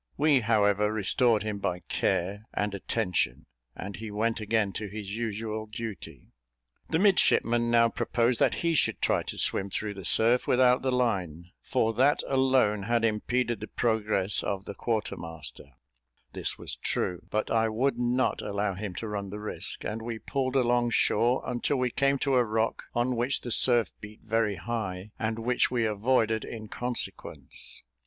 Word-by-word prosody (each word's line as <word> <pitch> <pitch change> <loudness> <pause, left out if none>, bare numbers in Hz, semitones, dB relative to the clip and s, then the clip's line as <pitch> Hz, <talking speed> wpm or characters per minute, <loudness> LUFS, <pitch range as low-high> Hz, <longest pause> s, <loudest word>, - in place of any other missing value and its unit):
We, 145 -2 +4
however, 105 -2 +2
restored 110 +1 +2
him 105 -2 -3
by 90 -2 -2
care 95 +5 -1
and 105 0 -1
attention, 100 -2 -1 0.3
and 100 +1 -7
he 110 +1 -7
went 110 +2 -1
again 110 -2 0
to 105 - -4
his 100 0 -6
usual 110 -1 -4
duty. 105 -4 -8 0.6
The 160 - +1
midshipman 120 - +3
now 115 0 +4
proposed 120 +1 0
that - - +3
he 170 - +3
should 155 - +1
try - - +1
to - - -7
swim 95 - +1
through 105 +2 -3
the 95 -1 -9
surf 115 +7 +5
without 125 0 +4
the 130 - 0
line, 90 -9 -1
for 115 0 0
that 135 +6 +3
alone 130 -6 +2
had 115 +3 +1
impeded 120 +2 0
the 110 - -6
progress 105 -4 +1
of 100 0 -3
the - - -6
quarter 110 +2 -2
master; 80 -4 -7 0.6
this - - -1
was - - -2
true, 90 -1 -2
but 110 - -2
I 115 -1 +2
would 120 +3 0
not 125 +1 +1
allow 100 -1 -2
him 95 -1 -6
to 115 - -5
run 100 -2 -4
the 105 - -6
risk, 105 0 -1
and 110 +1 -4
we 115 0 -4
pulled 130 +2 -2
along 120 -2 +2
shore, 120 +2 +2
until 125 +3 -1
we 125 -1 0
came 140 +2 +2
to 135 -2 +2
a 125 - +5
rock 110 0 -1
on 120 +1 +1
which 125 +4 +1
the 120 - -6
surf 120 -4 +4
beat 105 +1 -11
very 110 -2 0
high, 105 -3 -4
and 110 -1 -1
which 120 +2 +1
we 120 -2 0
avoided 110 +1 +1
in 110 -2 -8
consequence. 125 0 -6
110 Hz, 170 wpm, -28 LUFS, 105-120 Hz, 0.6 s, surf